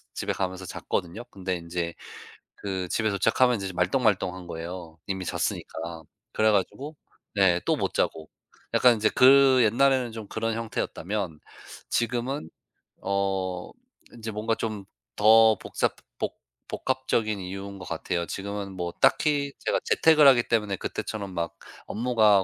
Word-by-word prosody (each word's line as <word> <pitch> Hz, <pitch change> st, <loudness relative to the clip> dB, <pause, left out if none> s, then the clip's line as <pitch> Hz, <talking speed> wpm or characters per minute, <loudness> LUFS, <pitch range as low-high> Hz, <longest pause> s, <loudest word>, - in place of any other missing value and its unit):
집에 -, -, -2 dB
가면서 95 Hz, 0 st, -3 dB
잤거든요. 90 Hz, +7 st, -3 dB
근데 95 Hz, -1 st, -3 dB
인제 85 Hz, 0 st, -4 dB, 0.6 s
그 95 Hz, -2 st, -4 dB
집에 110 Hz, -1 st, +1 dB
도착하면 115 Hz, +5 st, +3 dB
인제 100 Hz, -2 st, -3 dB
좀 90 Hz, -, -9 dB
말똥말똥한 95 Hz, -3 st, +1 dB
거예요 85 Hz, 0 st, -7 dB
이미 95 Hz, -1 st, -3 dB
잤으니까. 80 Hz, 0 st, -3 dB, 0.3 s
그래 110 Hz, 0 st, +3 dB
가지고 135 Hz, -, -1 dB, 0.4 s
네 90 Hz, -3 st, +4 dB
또 -, -, +3 dB
못 -, -, -2 dB
자고 80 Hz, -1 st, -1 dB, 0.4 s
약간 125 Hz, -1 st, +6 dB
인제 110 Hz, 0 st, +2 dB
그 130 Hz, 0 st, +7 dB
옛날에는 130 Hz, +1 st, +3 dB
좀 110 Hz, -3 st, -7 dB
그런 115 Hz, 0 st, -2 dB
형태였다면 100 Hz, -6 st, -3 dB, 0.5 s
지금은 120 Hz, -, -1 dB, 0.5 s
어 95 Hz, -2 st, -1 dB, 0.4 s
인제 115 Hz, -1 st, -7 dB
뭔가 110 Hz, +2 st, -1 dB
좀 105 Hz, -3 st, -4 dB, 0.3 s
더 110 Hz, 0 st, +6 dB
복잡 -, -, -1 dB, 0.2 s
복 -, -, -3 dB, 0.3 s
복합적인 115 Hz, -5 st, -1 dB
이유인 95 Hz, +2 st, -7 dB
것 -, -, -8 dB
같아요. 85 Hz, -1 st, -2 dB
지금은 100 Hz, 0 st, -5 dB
뭐 85 Hz, -2 st, -4 dB
딱히 140 Hz, -2 st, +3 dB
제가 -, -, 0 dB
재택을 155 Hz, -3 st, +5 dB
하기 120 Hz, -3 st, +7 dB
때문에 105 Hz, -4 st, 0 dB
그때처럼 100 Hz, 0 st, -5 dB
막 85 Hz, -1 st, -3 dB, 0.3 s
업무가 110 Hz, -4 st, +3 dB
100 Hz, 300 characters per minute, -26 LUFS, 90-115 Hz, 0.6 s, 그